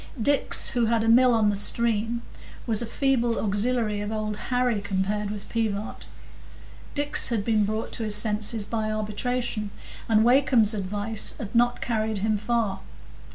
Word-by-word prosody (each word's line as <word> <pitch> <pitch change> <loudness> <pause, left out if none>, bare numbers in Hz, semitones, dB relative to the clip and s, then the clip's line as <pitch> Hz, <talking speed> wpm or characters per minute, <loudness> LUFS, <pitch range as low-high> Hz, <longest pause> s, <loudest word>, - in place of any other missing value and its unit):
Dix, 280 +5 +3
who 240 -1 0
had 230 -1 +1
a - - -1
mill 250 +2 +5
on 220 -3 +3
the - - -2
stream, 230 +2 +2 0.4
was 225 -2 +1
a 235 - -3
feeble 240 -2 0
auxiliary 210 +1 0
of 205 +1 -4
Old 215 -1 -3
Harry 245 -4 +1
compared 205 +1 -2
with 205 -1 -6
Pivart. 220 -2 -3 0.9
Dix 290 0 +2
had 220 -4 -2
been 215 -2 +2
brought 215 +2 -3
to 230 - -4
his 210 -1 +2
senses 210 0 0
by 215 0 -2
arbitration, 215 +1 -3 0.4
and 220 -1 +4
Wakem's 245 -4 +4
advice 205 +2 -3
had 210 -2 -7
not 240 +1 +2
carried 220 -2 -1
him 215 +2 0
far. 215 -3 -1
220 Hz, 155 wpm, -25 LUFS, 210-235 Hz, 0.9 s, mill